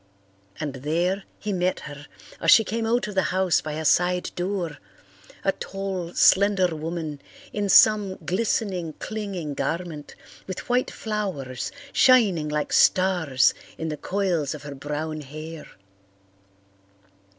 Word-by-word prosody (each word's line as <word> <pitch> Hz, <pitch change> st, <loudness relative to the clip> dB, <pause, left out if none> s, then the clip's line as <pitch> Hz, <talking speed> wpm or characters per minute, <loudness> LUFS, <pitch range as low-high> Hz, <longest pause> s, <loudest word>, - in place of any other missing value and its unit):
And 150 Hz, -3 st, -3 dB
there 170 Hz, +8 st, -1 dB
he 210 Hz, -1 st, -3 dB
met 185 Hz, 0 st, 0 dB
her, 145 Hz, 0 st, -9 dB, 0.3 s
as -, -, +1 dB
she 225 Hz, -, +8 dB
came 225 Hz, +1 st, -2 dB
out 240 Hz, 0 st, +1 dB
of 210 Hz, -, -6 dB
the 190 Hz, -, +3 dB
house 185 Hz, -1 st, +2 dB
by 155 Hz, -, -5 dB
a 160 Hz, +1 st, -4 dB
side 180 Hz, +3 st, +2 dB
door, 175 Hz, -5 st, -3 dB, 0.6 s
a 195 Hz, -, +3 dB
tall, 190 Hz, -3 st, -5 dB
slender 190 Hz, -3 st, +4 dB
woman 155 Hz, -2 st, -5 dB, 0.3 s
in 205 Hz, -1 st, -1 dB
some 205 Hz, -1 st, +6 dB
glistening, 185 Hz, -1 st, -1 dB
clinging 195 Hz, -9 st, -5 dB
garment, 165 Hz, -1 st, -4 dB, 0.3 s
with 185 Hz, -, -6 dB
white 250 Hz, +1 st, +1 dB
flowers 190 Hz, -, -4 dB, 0.2 s
shining 200 Hz, -12 st, +4 dB
like 150 Hz, 0 st, -2 dB
stars 175 Hz, -8 st, +4 dB, 0.2 s
in 160 Hz, -, -3 dB
the 155 Hz, -, -3 dB
coils 175 Hz, -6 st, -1 dB
of 145 Hz, -, -10 dB
her 145 Hz, -1 st, -7 dB
brown 150 Hz, +3 st, -4 dB
hair. 155 Hz, +3 st, -9 dB
175 Hz, 130 wpm, -25 LUFS, 155-195 Hz, 0.6 s, she